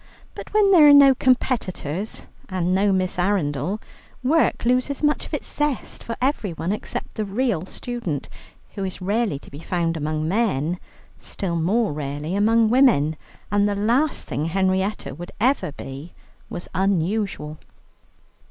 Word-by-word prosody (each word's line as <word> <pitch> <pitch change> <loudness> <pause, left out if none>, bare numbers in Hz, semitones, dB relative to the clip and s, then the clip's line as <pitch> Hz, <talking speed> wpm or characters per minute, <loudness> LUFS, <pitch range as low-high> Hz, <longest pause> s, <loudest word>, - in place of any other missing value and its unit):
But - - -9
when 415 -2 +4
there 315 -6 +8
are - - +9
no 280 -1 +8
competitors 220 - -1 0.2
and 185 -1 0
no 200 +2 +3
Miss 185 -1 0
Arundel, 175 -1 0 0.4
work 305 -1 +2
loses 255 +4 +1
much 295 0 +1
of - - -16
its - - -6
zest 295 -5 -2
for 230 - -4
everyone 200 - -1
except 210 - -4
the 215 - -2
real 200 -4 -1
student, 215 - -4 0.5
who 195 - -4
is 185 -1 -4
rarely 200 -3 0
to - - -15
be 140 - -9
found 165 0 -1
among 155 0 -2
men, 180 - 0 0.4
still 180 -4 -3
more 195 +5 +1
rarely 145 +3 -4
among 220 +2 +3
women. 225 - +4 0.4
And 205 0 +3
the 205 - -1
last 240 +9 +1
thing 145 +5 -2
Henrietta 190 +2 0
would 175 +5 -8
ever 230 - +2
be 140 +4 -9 0.3
was 175 - -6
unusual. 190 -4 -1
195 Hz, 145 wpm, -23 LUFS, 165-235 Hz, 0.5 s, are